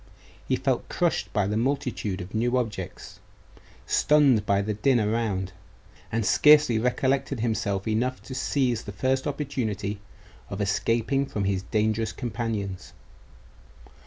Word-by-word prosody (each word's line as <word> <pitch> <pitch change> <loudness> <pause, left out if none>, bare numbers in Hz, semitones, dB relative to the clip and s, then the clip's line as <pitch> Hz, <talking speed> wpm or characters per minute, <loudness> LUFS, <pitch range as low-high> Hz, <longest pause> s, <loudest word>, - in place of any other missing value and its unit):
He - - +2
felt - - -1
crushed - - 0
by 105 -1 +1
the 105 +2 -1
multitude 120 -6 -1
of 90 +2 -9
new 120 +3 +1
objects, 105 -7 -5 0.7
stunned 140 -7 +3
by 100 0 +2
the 105 +1 -2
din 120 +4 +2
around; 105 -4 -1 0.6
and 115 -1 0
scarcely 150 -6 +5
recollected 130 +1 0
himself 110 -4 -1
enough 120 +4 0
to 130 - -8
seize 130 -3 0
the 100 - -7
first 130 +5 0
opportunity 110 -8 -3 0.5
of 100 - -5
escaping 115 +6 0
from 105 - -3
his 95 -1 0
dangerous 110 +2 0
companions. 110 -6 -4
110 Hz, 130 wpm, -26 LUFS, 100-130 Hz, 0.7 s, scarcely